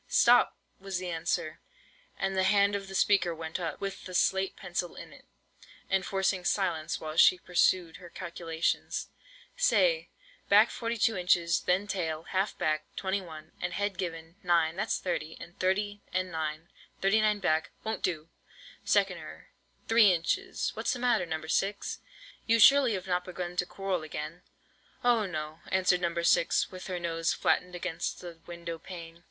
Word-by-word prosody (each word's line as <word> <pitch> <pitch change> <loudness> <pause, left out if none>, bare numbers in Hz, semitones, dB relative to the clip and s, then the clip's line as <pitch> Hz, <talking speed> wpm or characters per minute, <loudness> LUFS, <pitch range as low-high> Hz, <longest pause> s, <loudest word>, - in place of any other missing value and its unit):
"Stop!" - - +5 0.2
was 195 -1 -4
the 180 -1 -4
answer; 160 -1 -2 0.6
and 195 0 -1
the 190 - +2
hand 200 +1 +4
of 195 -1 -4
the 195 - -8
speaker 185 -4 +3
went 160 +1 -5
up, 165 -3 -4
with 195 -1 -5
the 185 -1 -7
slate 190 +1 +2
pencil 175 -1 -4
in - - -10
it, - - -17 0.7
enforcing 190 -1 +1
silence 170 -4 0
while 155 0 -6
she 185 - +7
pursued 180 -1 +1
her 175 -1 -12
calculations. 170 -2 -3 0.5
"Say, - - +2 0.4
back 210 +3 +6
42 230 -1 0
inches; 175 -2 +2
then 185 +3 +1
tail 165 -6 -3
(half 190 +2 -1
back) 155 0 0
21, 175 -5 -4
and 180 0 -2
head 200 0 -2
given, 165 -1 -5
9, 170 -3 +2
that's 215 +4 -1
30, 165 -3 -3
and 170 - -12
30 205 +2 0
and 185 0 -1
9, 160 +1 -4 0.3
39 210 +1 +3
back.—Won't 175 +6 -1
do! 160 -4 -2 0.6
Second - - +2
error: - - -11 0.4
three 225 -3 +6
inches—What's 365 - -1
the - - -4
matter, 240 -7 +1
No. 160 -1 -4
6? 195 +5 -1 0.5
You 230 0 +5
surely 265 +1 +7
have 190 -1 -4
not 180 -1 0
begun 180 -1 -6
to 180 0 0
quarrel 195 -1 -2
already?" 155 +1 -6 0.6
"Oh, 235 -4 +3
no," 155 -2 -5
answered 185 -1 +2
No. 170 -1 -1
6, 170 0 +2
with 185 0 -8
her 180 -2 -3
nose 165 -1 0
flattened 180 0 0
against 175 -1 -3
the 170 -2 -9
window 170 -1 -6
pane. 165 -1 -10
180 Hz, 155 wpm, -29 LUFS, 165-195 Hz, 0.7 s, she